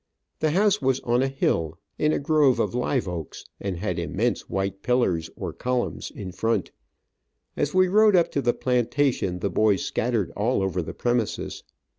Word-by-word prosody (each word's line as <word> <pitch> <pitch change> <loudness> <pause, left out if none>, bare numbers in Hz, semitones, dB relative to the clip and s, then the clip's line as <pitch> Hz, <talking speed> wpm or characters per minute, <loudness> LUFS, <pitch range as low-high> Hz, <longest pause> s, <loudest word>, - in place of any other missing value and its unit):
The 155 - +2
house 200 +4 +2
was 130 -1 +2
on 120 +1 +1
a 135 - +2
hill, 85 - -1 0.2
in 150 - +3
a - - +1
grove 145 -3 +3
of - - 0
live 125 -1 0
oaks, 85 -4 -6
and 95 -3 -3
had 90 -2 -2
immense 105 +8 -1
white 95 0 -2
pillars, 95 -10 +1
or - - -5
columns 125 -1 -2
in 95 -3 -7
front. 105 +2 -1 0.8
As 145 - -1
we 185 0 +5
rode 210 +2 +5
up 170 -2 +3
to 140 - 0
the 120 - +3
plantation 125 -5 0
the 100 - -1
boys 105 -3 +2
scattered 115 -6 -1
all 110 0 0
over 95 -1 -1
the 80 - -7
premises. 120 -3 -1
120 Hz, 175 wpm, -25 LUFS, 95-135 Hz, 0.8 s, we